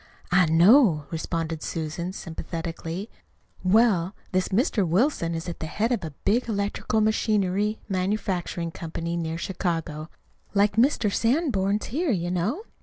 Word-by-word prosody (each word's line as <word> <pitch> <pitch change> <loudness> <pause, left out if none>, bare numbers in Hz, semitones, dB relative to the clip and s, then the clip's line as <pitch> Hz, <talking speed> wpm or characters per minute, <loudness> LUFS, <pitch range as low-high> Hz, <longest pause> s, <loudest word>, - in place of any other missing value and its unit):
"I 180 -1 +5
know," 170 - +5
responded 165 -1 -3
Susan 165 +2 -3
sympathetically. 165 +1 -5 0.6
"Well, 195 -2 +3 0.2
this 185 0 +1
Mr. 210 0 +1
Wilson 175 - +1
is 165 +1 -5
at 170 - -5
the 160 - -4
head 220 +8 -1
of 230 -7 0
a 160 - -3 0.2
big 235 +4 +2
electrical 205 +1 0
machinery 210 -1 +1
manufacturing 185 -3 -2
company 165 +1 -4
near 165 -1 -2
Chicago, 165 -4 -3 0.5
like 200 0 +3
Mr. 230 -4 +3
Sanborn's 225 - +1
here, 315 +7 -1
you 175 -6 0
know. 210 - -1
185 Hz, 130 wpm, -25 LUFS, 165-215 Hz, 0.6 s, I